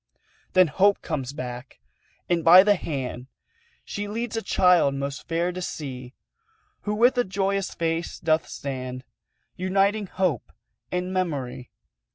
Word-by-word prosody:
Then 185 Hz, 0 st, +7 dB
Hope 195 Hz, +6 st, +3 dB
comes 135 Hz, -6 st, -3 dB
back, 125 Hz, -2 st, -7 dB, 0.5 s
and 170 Hz, -2 st, +1 dB
by 180 Hz, +3 st, +9 dB
the 205 Hz, 0 st, +5 dB
hand 130 Hz, -8 st, -4 dB, 0.6 s
She 205 Hz, 0 st, -4 dB
leads 230 Hz, +2 st, -4 dB
a 225 Hz, -, -1 dB
child 180 Hz, -7 st, +3 dB
most 140 Hz, +1 st, -5 dB
fair 170 Hz, +2 st, 0 dB
to 185 Hz, +1 st, -6 dB
see, 130 Hz, -7 st, -6 dB, 0.7 s
Who 210 Hz, 0 st, -1 dB
with 245 Hz, +4 st, +4 dB
a -, -, +4 dB
joyous 195 Hz, 0 st, -1 dB
face 165 Hz, 0 st, -2 dB
doth 160 Hz, 0 st, +1 dB
stand 130 Hz, -2 st, -5 dB, 0.5 s
Uniting 195 Hz, +3 st, +1 dB
Hope 170 Hz, -, -1 dB, 0.4 s
and 180 Hz, +1 st, -2 dB
Memory. 140 Hz, -9 st, -3 dB
175 Hz, 135 wpm, -25 LUFS, 140-195 Hz, 0.7 s, by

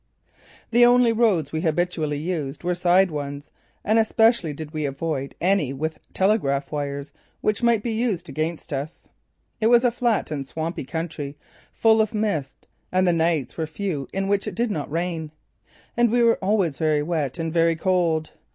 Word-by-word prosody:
The 240 Hz, +1 st, +5 dB
only 245 Hz, -1 st, +6 dB
roads 210 Hz, -, +2 dB
we 160 Hz, -, -2 dB
habitually 160 Hz, -2 st, 0 dB
used 155 Hz, -3 st, -4 dB
were 180 Hz, +1 st, +1 dB
side 180 Hz, +1 st, +3 dB
ones, 145 Hz, -1 st, -5 dB, 0.3 s
and 220 Hz, +2 st, +3 dB
especially 225 Hz, -5 st, +3 dB
did 150 Hz, +1 st, -7 dB
we 155 Hz, -1 st, -3 dB
avoid 140 Hz, -1 st, -3 dB
any 180 Hz, -7 st, +1 dB
with 155 Hz, +3 st, -4 dB
telegraph 165 Hz, -9 st, +1 dB
wires 140 Hz, -1 st, -4 dB, 0.3 s
which 215 Hz, +1 st, 0 dB
might 235 Hz, -3 st, +3 dB
be 235 Hz, -, -1 dB
used 220 Hz, -5 st, -1 dB
against 155 Hz, 0 st, -4 dB
us. 140 Hz, +4 st, -5 dB, 0.5 s
It 220 Hz, -, +2 dB
was 240 Hz, +1 st, +5 dB
a 245 Hz, -, +4 dB
flat 235 Hz, -7 st, 0 dB
and 140 Hz, -3 st, -4 dB
swampy 160 Hz, 0 st, -4 dB
country, 150 Hz, -2 st, -5 dB, 0.3 s
full 220 Hz, -1 st, +4 dB
of 215 Hz, 0 st, -1 dB
mist, 200 Hz, -11 st, -2 dB, 0.2 s
and 185 Hz, 0 st, +2 dB
the 175 Hz, -, +4 dB
nights 165 Hz, -4 st, 0 dB
were 160 Hz, -1 st, -2 dB
few 155 Hz, -4 st, -3 dB
in 195 Hz, 0 st, -2 dB
which 200 Hz, 0 st, 0 dB
it -, -, -4 dB
did 235 Hz, -1 st, 0 dB
not 150 Hz, -7 st, -3 dB
rain. 165 Hz, 0 st, -2 dB, 0.7 s
And 240 Hz, 0 st, +3 dB
we 240 Hz, 0 st, +3 dB
were 230 Hz, 0 st, +4 dB
always 190 Hz, -7 st, +1 dB
very 155 Hz, -2 st, +2 dB
wet 155 Hz, -3 st, -2 dB
and 165 Hz, -1 st, -3 dB
very 165 Hz, -1 st, +3 dB
cold. 165 Hz, -3 st, +1 dB
170 Hz, 175 wpm, -23 LUFS, 150-210 Hz, 0.7 s, only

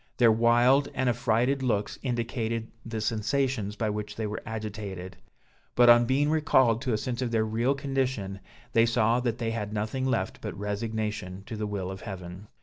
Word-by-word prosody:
Their 120 Hz, -2 st, +6 dB
wild 120 Hz, +5 st, +4 dB
and 130 Hz, -, 0 dB
affrighted 125 Hz, +2 st, +1 dB
looks 110 Hz, -5 st, -1 dB
indicated 115 Hz, -2 st, -2 dB
the 115 Hz, -1 st, -4 dB
sensations 110 Hz, -1 st, 0 dB
by 110 Hz, 0 st, -1 dB
which 105 Hz, 0 st, -5 dB
they 110 Hz, -, -3 dB
were 105 Hz, 0 st, -4 dB
agitated; 105 Hz, -4 st, -5 dB, 0.6 s
but 120 Hz, 0 st, +6 dB
on 120 Hz, 0 st, +5 dB
being 145 Hz, +4 st, +2 dB
recalled 130 Hz, -7 st, +3 dB
to 130 Hz, -4 st, -1 dB
a -, -, +2 dB
sense 120 Hz, +2 st, -3 dB
of 125 Hz, -, 0 dB
their 110 Hz, -1 st, +1 dB
real 115 Hz, +5 st, +1 dB
condition, 130 Hz, -8 st, -2 dB, 0.3 s
they 115 Hz, 0 st, +5 dB
saw 115 Hz, 0 st, +3 dB
that 120 Hz, -2 st, -1 dB
they 115 Hz, -1 st, -2 dB
had 105 Hz, -2 st, -4 dB
nothing 110 Hz, +5 st, -1 dB
left 130 Hz, -, -1 dB
but -, -, -5 dB
resignation 105 Hz, -2 st, -3 dB
to 115 Hz, -, -6 dB
the 105 Hz, 0 st, -3 dB
will 95 Hz, -2 st, -3 dB
of 95 Hz, -, -8 dB
heaven. 95 Hz, -1 st, -8 dB
115 Hz, 180 wpm, -28 LUFS, 105-125 Hz, 0.6 s, Their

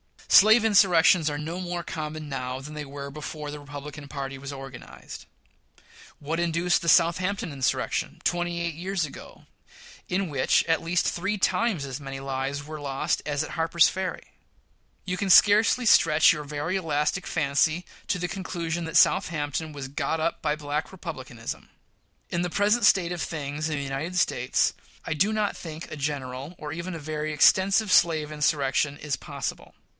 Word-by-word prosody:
Slave 220 Hz, +3 st, +7 dB
insurrections 180 Hz, -5 st, +5 dB
are 145 Hz, -, -3 dB
no 160 Hz, +4 st, -5 dB
more 175 Hz, -1 st, -4 dB
common 155 Hz, -1 st, -5 dB
now 130 Hz, -1 st, -4 dB
than 150 Hz, +3 st, -9 dB
they 150 Hz, -1 st, -5 dB
were 140 Hz, 0 st, -7 dB
before 150 Hz, 0 st, -6 dB
the 150 Hz, -, -7 dB
Republican 145 Hz, 0 st, -9 dB
party 135 Hz, -1 st, -5 dB
was 140 Hz, +1 st, -7 dB
organized. 135 Hz, -2 st, -10 dB, 0.9 s
What 160 Hz, +3 st, -3 dB
induced 170 Hz, +1 st, +1 dB
the 170 Hz, -, 0 dB
Southampton 180 Hz, +2 st, +2 dB
insurrection, 135 Hz, -3 st, -1 dB
twenty 175 Hz, 0 st, -1 dB
eight 170 Hz, -1 st, -2 dB
years 180 Hz, +2 st, -2 dB
ago, 145 Hz, -, -12 dB, 0.6 s
in 185 Hz, 0 st, -1 dB
which, 135 Hz, -3 st, +2 dB
at 165 Hz, -1 st, +1 dB
least, 170 Hz, +1 st, 0 dB
three 200 Hz, +4 st, -1 dB
times 200 Hz, -6 st, +1 dB
as 135 Hz, +1 st, -6 dB
many 135 Hz, -1 st, -7 dB
lives 135 Hz, +1 st, -3 dB
were 155 Hz, +1 st, -8 dB
lost 140 Hz, +3 st, -1 dB
as 145 Hz, 0 st, 0 dB
at -, -, -7 dB
Harper's 165 Hz, +1 st, +3 dB
Ferry? 190 Hz, -1 st, -5 dB, 0.7 s
You 180 Hz, -1 st, -2 dB
can 195 Hz, +1 st, -2 dB
scarcely 215 Hz, +6 st, +6 dB
stretch 160 Hz, -7 st, +6 dB
your 150 Hz, -2 st, -6 dB
very 150 Hz, +6 st, -2 dB
elastic 160 Hz, +1 st, -1 dB
fancy 155 Hz, +3 st, +1 dB, 0.2 s
to -, -, 0 dB
the 180 Hz, 0 st, -3 dB
conclusion 175 Hz, -2 st, -4 dB
that 160 Hz, -, 0 dB
Southampton 155 Hz, 0 st, +2 dB
was 135 Hz, -2 st, -6 dB
"got 155 Hz, +3 st, -2 dB
up 165 Hz, +1 st, -1 dB
by 150 Hz, -, 0 dB
Black 150 Hz, 0 st, -3 dB
Republicanism." 130 Hz, -11 st, -7 dB, 0.6 s
In 175 Hz, -, -1 dB
the 180 Hz, -, -1 dB
present 210 Hz, +5 st, +2 dB
state 180 Hz, -4 st, +4 dB
of 175 Hz, -2 st, -3 dB
things 150 Hz, -1 st, -3 dB
in 155 Hz, -, -1 dB
the 140 Hz, -, -3 dB
United 140 Hz, +6 st, -4 dB
States, 125 Hz, -7 st, +1 dB, 0.3 s
I 160 Hz, -, -1 dB
do 195 Hz, +7 st, +2 dB
not 210 Hz, -1 st, 0 dB
think 160 Hz, -1 st, -8 dB
a 155 Hz, -, -6 dB
general 140 Hz, +1 st, -4 dB
or 150 Hz, -1 st, -7 dB
even 170 Hz, +2 st, -5 dB
a -, -, -6 dB
very 155 Hz, 0 st, -4 dB
extensive 190 Hz, +7 st, +4 dB
slave 160 Hz, -4 st, +3 dB
insurrection 145 Hz, -1 st, 0 dB
is 145 Hz, -2 st, -3 dB
possible. -, -, -6 dB
155 Hz, 170 wpm, -26 LUFS, 145-175 Hz, 0.9 s, Slave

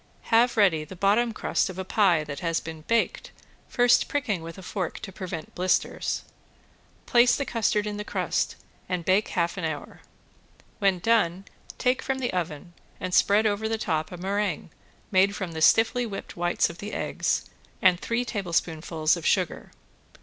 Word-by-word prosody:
Have 235 Hz, +1 st, +4 dB
ready 180 Hz, -7 st, +4 dB
the 185 Hz, -, -10 dB
bottom 205 Hz, +6 st, +2 dB
crust 215 Hz, -, 0 dB
of 185 Hz, -, -8 dB
a 190 Hz, -, -4 dB
pie 185 Hz, -6 st, +3 dB
that 145 Hz, -2 st, -6 dB
has 165 Hz, -2 st, 0 dB
been 160 Hz, -1 st, -8 dB
baked, 230 Hz, 0 st, 0 dB, 0.4 s
first 245 Hz, 0 st, +4 dB
pricking 265 Hz, -, -1 dB
with 165 Hz, +2 st, -8 dB
a 190 Hz, -, -10 dB
fork 185 Hz, -2 st, -3 dB
to 200 Hz, -, -7 dB
prevent 180 Hz, -4 st, -7 dB
blisters. 185 Hz, +1 st, 0 dB, 0.8 s
Place 240 Hz, 0 st, +5 dB
the 280 Hz, -, -2 dB
custard 215 Hz, -3 st, 0 dB
in 210 Hz, 0 st, -4 dB
the 210 Hz, -, -4 dB
crust -, -, -1 dB, 0.3 s
and 180 Hz, -2 st, -2 dB
bake 190 Hz, +3 st, +3 dB
half 170 Hz, 0 st, -1 dB
an 180 Hz, -, -4 dB
hour. 155 Hz, -3 st, -5 dB, 0.8 s
When 195 Hz, -2 st, +3 dB
done 190 Hz, -2 st, +1 dB, 0.3 s
take 250 Hz, +1 st, +1 dB
from 265 Hz, -1 st, -2 dB
the 255 Hz, -2 st, -2 dB
oven 170 Hz, -1 st, -4 dB, 0.3 s
and 185 Hz, 0 st, -4 dB
spread 205 Hz, +4 st, +4 dB
over 215 Hz, +1 st, 0 dB
the 225 Hz, -, 0 dB
top 160 Hz, -7 st, -2 dB
a 180 Hz, -, -7 dB
meringue 195 Hz, -2 st, -2 dB, 0.4 s
made 195 Hz, +1 st, +4 dB
from 190 Hz, -4 st, -4 dB
the 160 Hz, -1 st, -5 dB
stiffly 225 Hz, +8 st, +4 dB
whipped 200 Hz, -2 st, -7 dB
whites 175 Hz, 0 st, +1 dB
of 170 Hz, -, -10 dB
the 205 Hz, +1 st, -6 dB
eggs, -, -, -1 dB, 0.3 s
and 180 Hz, -2 st, +4 dB
three 235 Hz, +4 st, -1 dB
tablespoonfuls 165 Hz, -6 st, 0 dB
of 170 Hz, -, -7 dB
sugar. 180 Hz, 0 st, 0 dB
190 Hz, 170 wpm, -26 LUFS, 170-220 Hz, 0.8 s, Place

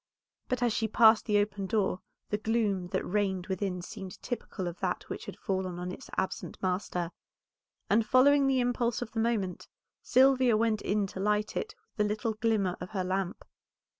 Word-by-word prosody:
But 250 Hz, -1 st, 0 dB
as 240 Hz, -2 st, +2 dB
she 220 Hz, -, 0 dB
passed 220 Hz, 0 st, +6 dB
the 210 Hz, -1 st, +3 dB
open 205 Hz, -1 st, 0 dB
door 195 Hz, -3 st, 0 dB, 0.3 s
the 210 Hz, -, 0 dB
gloom 210 Hz, -5 st, 0 dB
that -, -, -2 dB
reigned 190 Hz, -2 st, 0 dB
within 190 Hz, -2 st, -2 dB
seemed 185 Hz, +1 st, -8 dB
typical 220 Hz, -6 st, -4 dB
of 175 Hz, 0 st, -6 dB
that -, -, -2 dB
which -, -, -6 dB
had -, -, -7 dB
fallen 190 Hz, -3 st, -2 dB
on 180 Hz, +1 st, -4 dB
its 260 Hz, -, -9 dB
absent 190 Hz, -, -2 dB
master, 180 Hz, -2 st, -2 dB, 0.8 s
and 220 Hz, +3 st, +4 dB
following 275 Hz, +5 st, +5 dB
the 265 Hz, -1 st, +3 dB
impulse 245 Hz, -1 st, 0 dB
of 225 Hz, -, -10 dB
the 225 Hz, -, -3 dB
moment 220 Hz, -5 st, -1 dB, 0.3 s
Sylvia 255 Hz, -3 st, +4 dB
went 220 Hz, -1 st, +1 dB
in 205 Hz, 0 st, +1 dB
to 190 Hz, -, -7 dB
light 210 Hz, +1 st, 0 dB
it 430 Hz, -, -3 dB, 0.2 s
with 210 Hz, -1 st, +2 dB
the 210 Hz, -, +1 dB
little 225 Hz, 0 st, -2 dB
glimmer 215 Hz, -4 st, +1 dB
of 180 Hz, -, -6 dB
her 185 Hz, -, +1 dB
lamp. 185 Hz, 0 st, -2 dB
210 Hz, 185 wpm, -30 LUFS, 190-230 Hz, 0.8 s, passed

